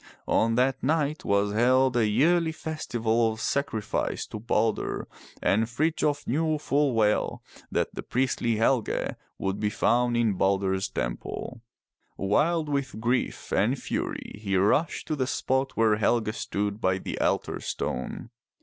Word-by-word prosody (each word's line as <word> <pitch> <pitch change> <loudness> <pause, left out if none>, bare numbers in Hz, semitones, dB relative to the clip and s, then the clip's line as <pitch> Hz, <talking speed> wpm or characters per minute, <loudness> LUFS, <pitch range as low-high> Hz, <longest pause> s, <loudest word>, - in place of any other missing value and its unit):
On 115 0 +2
that 130 +2 +2
night 150 +1 0
was 100 0 +1
held 130 +3 +3
a 115 -3 +3
yearly 160 +9 +3
festival 120 -8 -1
of 110 - -7
sacrifice 115 -8 -1
to 105 - -7
Balder, 115 0 0 0.4
and 110 +3 +2
Frith 155 +7 0
j - - +2
of 145 0 -2
knew 155 +4 +1
full 145 -3 +1
well 105 -1 +1 0.3
that - - 0
the - - -5
priestly 125 -2 0
Helge 115 +1 +1 0.2
would 95 0 -2
be 105 - +1
found 120 +3 +2
in 115 -3 +2
Balder's 95 0 +1
Temple. - - -4 0.6
Wild 155 - +1
with 140 -5 -2
grief 120 +3 -1
and - - +2
fury - - -4
he 100 -3 -1
rushed 105 - +2
to 155 - -1
the 130 -3 -1
spot 130 +1 -1
where 110 -2 +4
Helge 110 0 +1
stood 105 0 -3
by 95 -1 +2
the - - -5
altar - - 0
stone. 65 - -4
120 Hz, 150 wpm, -27 LUFS, 105-140 Hz, 0.6 s, where